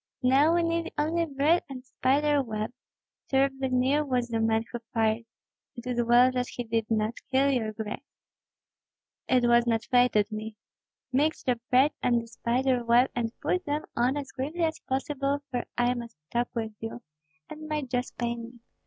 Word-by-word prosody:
Now 280 +6 +5
we 345 - +2
need 335 0 -1
only 325 +3 +1
bread 295 +4 +2
and 255 -1 -8
spider 285 +3 +2
web. 220 -2 -4 0.6
Terribly 270 0 +1
near 260 +4 +2
was 250 -4 -1
the 225 -1 -1
man 225 0 +1
who 240 - -4 0.2
fired. 225 0 +1 0.5
It 240 0 -9
is 245 -1 0
well 240 +2 +5
that 250 -1 -1
he 245 - -5
did 225 -1 -1
not 220 +1 0
kill 270 +1 +4
your 230 -5 0
grace." 215 +2 -5 1.3
"It 250 -2 +3
was 240 0 +4
not 225 -1 +1
fated 245 -4 +3
me. 215 0 -5 0.6
Mix 300 +4 +1
the 245 -2 0
bread 265 +4 +5
and 240 -1 +3
the 230 - -7
spider 245 +2 0
web 240 +2 +4
and 230 -2 -1
put 365 0 0
them 295 +1 -1
on 250 +4 +2
as 280 -2 -5
quickly 295 +6 -3
as 320 -1 0
possible, 275 +1 -2
for 245 -2 -2
I 245 0 +3
must 235 -4 -7
talk 240 +1 0
with 225 -1 -2
you, 225 +2 -6 0.4
and 310 0 -9
my 305 -1 -1
jaws 250 -1 -2
pain 235 -1 -3
me." 235 +1 -11
250 Hz, 180 wpm, -28 LUFS, 235-280 Hz, 1.3 s, Now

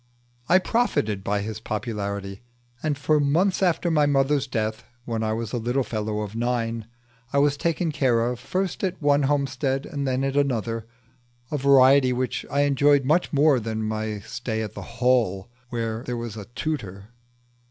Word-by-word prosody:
I 185 - +7
profited 185 - 0
by 100 +1 0
his 110 +1 -5
popularity, 100 -3 -4 0.4
and 150 -2 -1
for 150 +1 +2
months 170 +8 +2
after 175 -1 +2
my 150 -2 +3
mother's 140 0 +2
death, 110 -3 -2 0.2
when 115 -2 -2
I 110 0 0
was 115 -1 -4
a 120 - 0
little 120 +4 0
fellow 105 -2 -3
of 105 0 -6
nine, 115 -1 -1 0.4
I 140 - 0
was 145 0 +4
taken 165 +1 -1
care 125 -5 +2
of 120 0 -2
first 185 +9 -2
at 185 -1 -1
one 145 -1 +3
homestead 135 -1 0
and 140 -4 -3
then 130 +1 0
at 135 0 -1
another; 115 -5 0 0.6
a 150 - 0
variety 135 -1 +6
which 125 +1 -2
I 140 - +1
enjoyed 145 0 +3
much 160 +6 +2
more 145 -2 +4
than 110 -1 -3
my 110 0 -2
stay 115 0 -4
at 105 - -6
the - - -7 0.2
Hall, 120 -5 +1 0.2
where 115 -2 -3
there 125 -1 -4
was 115 -2 -5
a 105 -2 -7
tutor. 110 -6 -5
125 Hz, 175 wpm, -24 LUFS, 110-145 Hz, 0.6 s, I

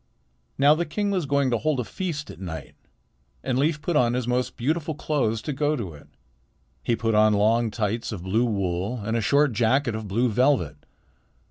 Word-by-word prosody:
Now 145 +2 +6
the 165 +3 0
king 200 +6 -1
was 180 -7 -1
going 140 -2 +2
to 120 - +1
hold 155 -4 0
a - - 0
feast 160 - -4
at - - -13
night, 80 -5 -7 0.7
and 130 0 0
Leif 150 +1 0
put 175 - -1
on 120 -3 +3
his 125 -1 -2
most 125 +1 -1
beautiful 155 +4 -1
clothes 130 -8 -1
to 150 - -3
go 150 +2 +1
to 100 - -5
it. 75 - -15 0.7
He 120 - 0
put 115 -1 -1
on 105 0 +5
long 110 +3 +3
tights 110 +2 -2
of 95 -5 -6
blue 110 +6 +1
wool 100 +1 -1
and 110 +2 -1
a 115 - +1
short 140 +5 +3
jacket 120 +3 +2
of 110 -1 -5
blue 115 +6 +1
velvet. 120 - +2
120 Hz, 200 wpm, -25 LUFS, 110-145 Hz, 0.7 s, Now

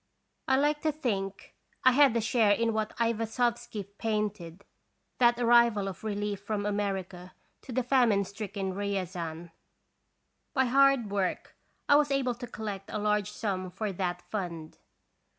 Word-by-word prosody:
I 265 - +4
like 295 +2 +1
to 315 - +1
think 200 -10 -3 0.3
I 255 - +8
had 265 -2 +5
a - - +1
share 220 -1 +3
in 230 +1 +1
what 215 -1 -2
Aivasovky 230 -2 -1
painted, 210 -5 -3 0.5
that 240 -1 +4
arrival 235 -4 +4
of 195 +1 -7
relief 205 -2 -3
from 205 0 -3
America 195 -3 -3 0.3
to - - -10
the 255 +1 0
famine 240 -6 +3
stricken 200 -1 -5
Riazan. 180 -4 -4 1.0
By 265 -1 +3
hard 270 -3 +4
work 195 -2 -2 0.3
I 285 - +7
was 295 -1 +2
able 270 -3 +1
to 245 +1 -8
collect 205 -4 -6
a - - -3
large 210 -1 0
sum 190 -4 -3
for 200 +3 -3
that 180 -1 -3
fund. 170 -6 -6
210 Hz, 145 wpm, -29 LUFS, 195-240 Hz, 1.0 s, I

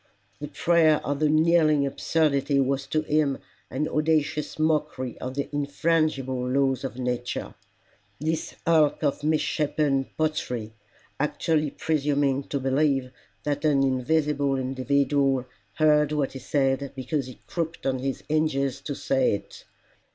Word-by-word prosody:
The 150 - -5
prayer 160 0 +3
of 140 0 -1
the 155 -1 +3
kneeling 155 -2 +4
absurdity 140 -1 +1
was 135 0 0
to 155 +2 0
him 150 -3 +1 0.3
an 150 +4 -1
audacious 150 -1 0
mockery 150 -5 0
of 130 +1 -5
the 140 - -2
infrangible 145 -3 0
laws 135 -1 +1
of 130 -2 -5
Nature: 125 -1 -3 0.7
this 160 +2 -2
hulk 160 -2 +3
of 145 0 0
misshapen 150 -2 +1
pottery 125 -8 -2 0.5
actually 150 +1 0
presuming 145 -3 0
to 140 - -3
believe 135 -1 +1 0.3
that 145 0 -2
an 145 -3 +3
invisible 140 +1 +1
individual 135 0 +1 0.3
heard 150 -1 +3
what 145 -3 0
he 135 - -6
said 135 +1 0
because 135 +1 -2
he 130 - -10
crooked 160 -6 -2
his 135 0 -3
hinges 140 -4 0
to 145 -1 -5
say 130 -3 +1
it! 100 - -10
145 Hz, 130 wpm, -26 LUFS, 135-155 Hz, 0.7 s, kneeling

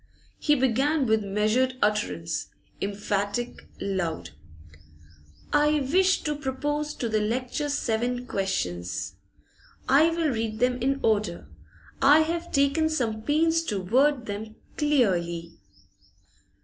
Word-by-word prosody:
He 295 - +3
began 265 +3 +2
with 220 -2 +2
measured 215 +6 +1
utterance, 90 - -1 0.3
emphatic, 205 +3 -2
loud. 190 -5 -3 1.2
'I 295 0 +3
wish 375 0 +3
to 300 -1 -1
propose 295 +2 -3
to 240 - -2
the 220 -1 +1
lecturer 255 +6 -2
seven 245 -2 -1
questions. 90 - -3 0.7
I 295 +5 +5
will 330 -2 0
read 225 -3 -2
them 250 +1 +1
in 275 +2 0
order; 210 -6 0 0.5
I 290 +3 +7
have 335 +2 -2
taken 280 +3 +2
some 230 -8 -1
pains 325 +6 +2
to 210 -9 -2
word 255 +7 +2
them 215 +1 -6 0.2
clearly. 175 - 0
245 Hz, 110 wpm, -26 LUFS, 205-295 Hz, 1.2 s, I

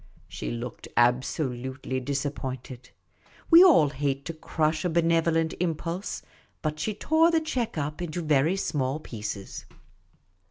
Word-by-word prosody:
' - - -31
' - - -28
She - - -5
looked 120 0 -6
absolutely 130 +1 0
disappointed; 130 -2 -4 0.6
we 335 +2 +10
all 270 - +6
hate 140 0 -2
to 165 - -4
crush 155 0 -1
a 180 - +1
benevolent 165 -1 +2
impulse; 170 +2 -3 0.4
but 155 -1 -2
she 215 +4 -2
tore 315 +8 +3
the 330 -1 +3
cheque 255 - -3
up 150 +3 -3
into 175 0 -3
very 155 +3 +3
small 140 -6 -1
pieces. 105 -7 -6
155 Hz, 135 wpm, -27 LUFS, 130-170 Hz, 0.6 s, we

